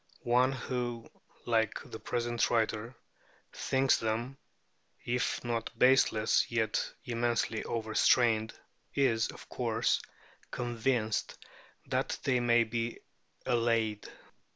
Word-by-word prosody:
One 125 +2 +3
who 120 -2 -4 0.4
(like 110 -3 +1
the 110 - -6
present 120 -1 -1
writer) 115 +1 0 0.6
thinks 135 0 +2
them, 115 +4 -3 0.7
if 125 +1 -1
not 115 -1 -2
baseless, 125 -4 +4
yet 110 -2 0
immensely 115 -2 0
overstrained, 110 0 +2 0.4
is, 120 -5 +2
of - - -11
course, - - 0 0.5
convinced 120 -2 -1 0.5
that - - -1
they 130 -2 +2
may 120 -1 +4
be 115 +1 -3 0.5
allayed. 115 -3 0
120 Hz, 95 wpm, -31 LUFS, 110-125 Hz, 0.7 s, baseless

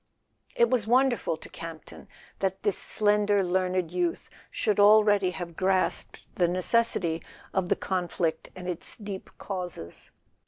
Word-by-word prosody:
It 235 - +4
was 235 -5 +1
wonderful 245 -8 +2
to - - -12
Campton 165 -1 -10 0.3
that 190 0 -2
this 205 -3 +2
slender 205 -1 +2
learned 185 -1 0
youth 175 -1 -2 0.2
should 210 -1 0
already 205 -2 +6
have 175 -2 -6
grasped 190 +1 0
the 175 - +3
neces¬ 205 +7 +2
sity 165 -2 -2 0.3
of 185 -2 0
the - - +3
conflict 175 -3 -2
and 180 -1 -8
its 180 -2 -5
deep 200 -3 -7
causes. 180 - -7
190 Hz, 135 wpm, -27 LUFS, 175-205 Hz, 0.3 s, already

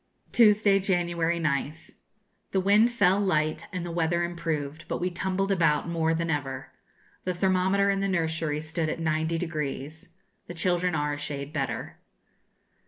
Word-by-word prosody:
Tuesday, 210 -3 +5
January 170 -3 0
9th. 155 -1 -2 0.6
The 190 - +3
wind 205 +5 +5
fell 200 -5 +3
light, 155 -6 0
and 180 -2 -4
the 175 - -5
weather 170 +1 +1
improved; 160 -3 -3
but - - -2
we 180 +1 -1
tumbled 190 +2 -1
about 165 -4 +2
more 165 -1 +1
than 165 0 -1
ever. 135 -3 -3 0.5
The 180 -1 -2
thermometer 190 +2 +2
in 195 - 0
the 195 - 0
nursery 160 -4 -1
stood 160 0 -2
at - - -2
90°. 160 -1 -2 0.4
The - - -6
children 175 0 +1
are 150 -1 0
a 145 - -5
shade 145 0 -5
better. 135 -6 -3
170 Hz, 150 wpm, -27 LUFS, 155-185 Hz, 0.6 s, Tuesday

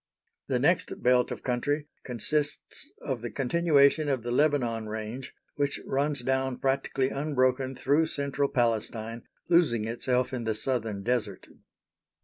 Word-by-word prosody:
The 130 - +1
next 170 +7 +1
belt 125 0 +4
of - - -6
country 145 +4 -1 0.2
consists 145 +4 -2
of 125 -4 -3
the 120 - -4
continuation 145 +2 +3
of 130 -5 0
the 120 - -3
Lebanon 125 -6 +1
range, 110 +4 -6 0.2
which 145 -1 0
runs 140 -1 0
down 130 0 0
practically 135 0 0
unbroken 130 -2 0
through 145 +6 +2
central 140 -1 -1
Palestine, 115 -1 -1 0.2
losing 145 -11 +3
itself 125 +3 -1
in 125 -2 -2
the 110 -1 -1
Southern 110 -3 -2
Desert. 110 -5 -1
130 Hz, 130 wpm, -28 LUFS, 120-145 Hz, 0.2 s, belt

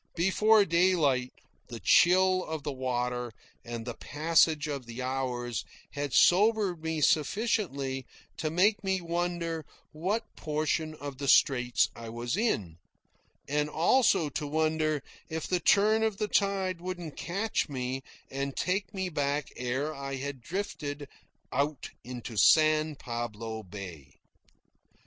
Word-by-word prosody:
Before 205 +4 +4
daylight, 165 -8 +2 0.4
the 120 -2 -7
chill 185 - +5
of 160 -2 -5
the 145 - -2
water 125 -2 -2 0.3
and 120 -1 -6
the 120 - -4
passage 155 +2 +2
of 140 -5 -5
the 120 +2 -6
hours 125 -3 -2 0.3
had 145 -1 -3
sobered 200 - +4
me 160 -1 -2
sufficiently 145 - 0 0.3
to 155 - -1
make 205 +7 +2
me 190 -1 +1
wonder 170 -1 -2 0.3
what 190 +9 -3
portion 155 +1 -1
of 140 -2 -8
the 140 - -3
Straits 125 -2 +4
I 115 -1 -8
was 120 +4 -3
in, 100 - -1 0.7
and 150 +1 0
also 170 +1 +3
to 145 +1 -4
wonder 155 -1 0 0.3
if 160 -1 -3
the 180 - 0
turn 210 +5 +4
of 220 -3 0
the 210 0 -1
tide 195 -4 0
wouldn't 175 -4 -6
catch 195 +2 -2
me 130 -1 -3 0.3
and 135 0 -3
take 190 +2 -1
me 190 -1 -1
back 145 -3 -1
ere 130 +5 -2
I 135 -1 -5
had 135 -1 -5
drifted 145 -4 -4 0.5
out 140 +2 -1
into 120 -1 -7
San 155 +6 +5
Pablo 115 -3 -5
Bay. 90 -9 -10
150 Hz, 130 wpm, -29 LUFS, 130-180 Hz, 0.7 s, chill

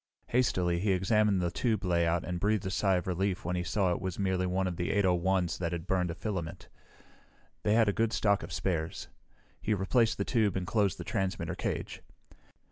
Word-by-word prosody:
Hastily 90 -8 +1
he 100 +1 +2
examined 100 0 +2
the 85 - 0
tube 110 0 0
layout 85 -1 +2
and 90 -1 -3
breathed 105 0 +1
a 95 - -2
sigh 95 -1 +2
of 90 - -1
relief 95 0 -1
when 90 +1 -1
he 90 - 0
saw 95 +1 +1
it 85 - -2
was 95 -2 -3
merely 95 -2 0
one 95 +1 0
of 90 -1 -2
the 85 - -2
801's 95 -2 +1
that 85 -1 -2
had 85 -1 -4
burned 90 -2 0
a 85 - -4
filament. 85 -3 -5 0.9
They 105 - +2
had 115 -1 +4
a 105 - +2
good 115 +1 +1
stock 100 -1 +2
of - - -8
spares. 85 -2 -2 0.5
He 110 - +1
replaced 115 +4 +2
the 100 - -1
tube 110 -6 +1
and 95 -1 -2
closed 100 -1 +1
the - - -6
transmitter 95 -1 -2
cage. - - -4
95 Hz, 205 wpm, -30 LUFS, 90-105 Hz, 0.9 s, had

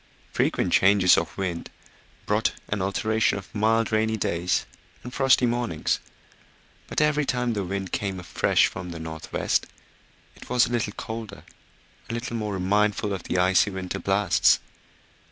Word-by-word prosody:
Frequent - - 0
changes 95 -2 +5
of - - -2
wind 90 -4 -3 0.6
brought - - +1 0.2
an 100 -1 -1
alternation 110 +3 +1
of 100 - -10
mild 110 +1 +2
rainy 110 0 +1
days 90 -2 0 0.4
and 125 - -8
frosty 135 -2 +4
mornings; 120 -9 -1 0.9
but - - -2
every 150 0 +2
time 125 -3 0
the 100 -2 -2
wind 95 0 -4
came 95 -2 -2
afresh 90 - +2
from 90 -1 -5
the 85 -1 -7
north 80 -1 -8
west - - 0 0.7
it - - -14
was 125 -1 +4
a 120 - -6
little 110 -4 -1
colder, 110 -3 -7 0.7
a - - -3
little 120 0 -4
more 105 -2 -2
remindful 105 +2 +1
of 95 - -4
the - - -1
icy 95 +3 +4
winter 95 0 -4
blasts. 95 0 +3
105 Hz, 155 wpm, -25 LUFS, 95-115 Hz, 0.9 s, changes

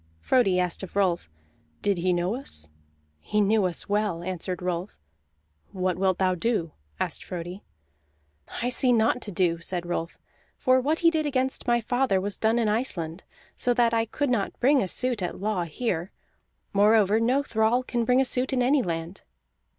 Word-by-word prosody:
Frodi 195 - +2
asked 180 -2 -1
of 190 -1 -9
Rolf: 180 - +1 0.5
"Did 200 -3 +1
he 180 +1 +1
know 175 +3 0
us?" 75 - -4 0.5
"He 210 - -1
knew 210 0 +3
us 175 -2 -2
well," 205 -4 -1
answered 185 0 -4
Rolf. 180 +2 -3 0.8
"What 185 -1 0
wilt 185 0 +1
thou 185 -1 +2
do?" 180 -3 -1 0.3
asked - - -1
Frodi. 180 +2 -6 1.0
"I 245 - +1
see 250 0 +2
naught 230 +2 +2
to 205 - -5
do," 170 -2 +1
said 175 +1 -3
Rolf. 170 -1 -3 0.4
"For 255 0 +3
what 305 +6 0
he 335 -1 +5
did 310 -2 0
against 260 -2 -1
my 240 0 +3
father 245 -3 +1
was 200 +1 -4
done 225 +1 +2
in 230 -2 +1
Iceland, 190 -7 -1 0.3
so 245 -1 +1
that 235 -1 +3
I 225 0 +2
could 275 +4 -2
not 210 -5 -1
bring 270 +2 +4
a 190 - -1
suit 250 +2 +1
at 180 - -4
law 200 -3 -1
here. 175 +1 -3 0.6
Moreover, 210 +1 +4
no 255 +5 +2
thrall 230 0 +1
can 240 -2 -1
bring 250 +2 +3
a 265 - +3
suit 255 +1 +1
in 255 -2 +1
any 270 +3 +3
land." 165 -1 -4
210 Hz, 180 wpm, -26 LUFS, 180-245 Hz, 1.0 s, he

